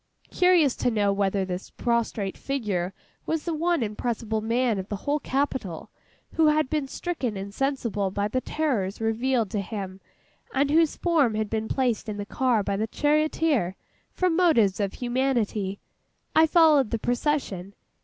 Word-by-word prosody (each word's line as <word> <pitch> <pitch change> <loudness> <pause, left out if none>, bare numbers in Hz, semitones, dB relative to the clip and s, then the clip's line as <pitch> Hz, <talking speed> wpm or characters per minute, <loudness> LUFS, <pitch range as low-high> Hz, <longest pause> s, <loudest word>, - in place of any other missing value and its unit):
Curious 355 -7 +4
to - - +1
know 205 -3 +1
whether 195 -1 0
this 180 0 -5
prostrate 230 -4 -1
figure 205 -10 -2 0.4
was 320 -1 -1
the 340 - -1
one 335 -2 +1
impressible 220 0 -2
man 230 -1 +1
of 190 - -6
the 205 - -2
whole 290 +1 +1
capital 265 - -2 0.4
who 320 -1 +4
had 300 -2 +2
been 300 -3 0
stricken 265 - -3
insensible 210 0 -2
by 200 +2 -1
the 255 +5 -1
terrors 240 -13 -1
revealed 225 -1 0
to 205 - -1
him, 195 -1 -6 0.5
and 280 +1 +2
whose 320 0 +3
form 305 -10 +2
had 215 -1 -2
been 220 0 -1
placed 245 -4 0
in 210 - -4
the 205 - -4
car 240 -1 +1
by 200 - -1
the 220 +2 -1
charioteer, 295 - +1 0.4
from 365 -3 +1
motives 265 - +3
of 200 -2 -1
humanity, 240 -6 -1 0.6
I 320 0 +6
followed 310 -7 +5
the 230 - -1
procession. 235 - -2
235 Hz, 155 wpm, -26 LUFS, 205-290 Hz, 0.6 s, I